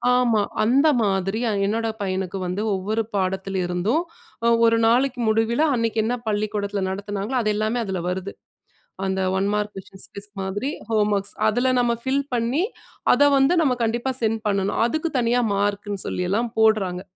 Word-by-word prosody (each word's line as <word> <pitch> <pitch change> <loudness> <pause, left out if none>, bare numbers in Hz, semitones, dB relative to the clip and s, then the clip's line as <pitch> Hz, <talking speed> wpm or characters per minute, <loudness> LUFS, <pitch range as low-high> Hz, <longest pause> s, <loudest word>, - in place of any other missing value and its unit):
ஆமா, 235 -4 +3 0.2
அந்த 270 +7 +4
மாதிரி 195 +1 0
அ - - +1
என்னோட 225 +2 0
பையனுக்கு 190 0 -2
வந்து 180 +3 -2
ஒவ்வொரு 215 +4 -1
பாடத்திலிருந்தும் 190 - 0 0.5
அ - - +5 0.2
ஒரு 230 0 +3
நாளைக்கு 250 +2 +2
முடிவில, 225 +4 +1
அன்னைக்கு 230 -2 0
என்ன 245 +2 0
பள்ளிக்கூடத்தில 205 -1 -1
நடத்தினாங்களோ 200 +5 -3
அது 215 -1 +1
எல்லாமே 215 +3 0
அதுல 190 -3 -3
வருது. 190 +2 -4 0.7
அந்த 190 0 -1 0.2
ஒன் 200 +1 +1
மார்க் 210 0 -1
கொஸ்டின்ஸ் 190 0 -11
குவிஸ் 205 +1 -8
மாதிரி 205 +9 -2 0.2
ஹோம்வொர்க்ஸ். 210 -2 +1
அதுல 245 +4 +1
நம்ம 240 -1 +2
ஃபில் 275 +2 +1
பண்ணி, 240 +8 0 0.5
அத - - +2 0.2
வந்து 270 +6 +4
நம்ம 265 -4 +2
கண்டிப்பா 235 +4 -1
சென்ட் 220 0 0
பண்ணணும். 200 0 0
அதுக்கு 315 +6 -1
தனியா 245 0 +2
மார்க்குன்னு 205 0 -2
சொல்லியல்லாம் 205 +6 -1
போட்றாங்க. 195 -5 +2
210 Hz, 150 wpm, -23 LUFS, 195-235 Hz, 0.7 s, அ